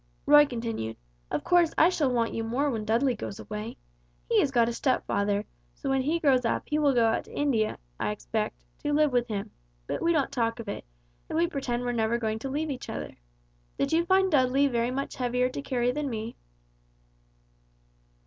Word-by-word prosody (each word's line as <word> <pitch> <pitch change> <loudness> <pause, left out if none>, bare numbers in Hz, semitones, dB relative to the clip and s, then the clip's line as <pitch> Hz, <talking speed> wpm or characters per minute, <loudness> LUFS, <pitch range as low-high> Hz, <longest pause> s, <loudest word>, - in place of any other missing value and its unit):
Roy 295 0 +7
continued: 230 - -4 0.3
"Of - - -2
course 350 -2 +3
I 325 - +6
shall 310 -7 +1
want 235 -2 0
you 225 - -2
more 265 +6 0
when 220 -3 -3
Dudley 240 +4 +2
goes 210 -3 -6
away. 215 +2 -6 0.5
He - - +3
has - - +3
got 240 -3 +3
a 235 - -1
stepfather, 205 -5 0 0.3
so 275 - -3
when 270 0 +2
he 310 +6 0
grows 270 -5 +3
up 230 - 0
he 300 - 0
will 285 -3 +3
go 235 -1 +4
out 225 - +1
to - - -11
India, 245 -7 +1 0.2
I - - 0
expect, - - -3
to 295 - -1
live 300 -1 +3
with 245 -1 +2
him, 200 -3 -4 0.3
but - - -3
we 335 - +3
don't 300 -5 +1
talk 230 -1 -1
of 230 - -7
it, 200 - -5 0.4
and - - -2
we 335 - +4
pretend 260 -7 -2
we're 245 - -1
never 230 0 +1
going 220 -2 -2
to 270 - -5
leave 300 +3 -2
each 260 - -6
other. - - -5 0.6
Did - - 0
you 335 +1 +4
find 380 +1 +4
Dudley 270 -1 +4
very 240 -3 +1
much 270 +2 -4
heavier 250 0 +1
to 270 - -5
carry 245 -3 0
than 290 +1 -2
me?" 225 0 -5
250 Hz, 205 wpm, -28 LUFS, 230-290 Hz, 0.6 s, Roy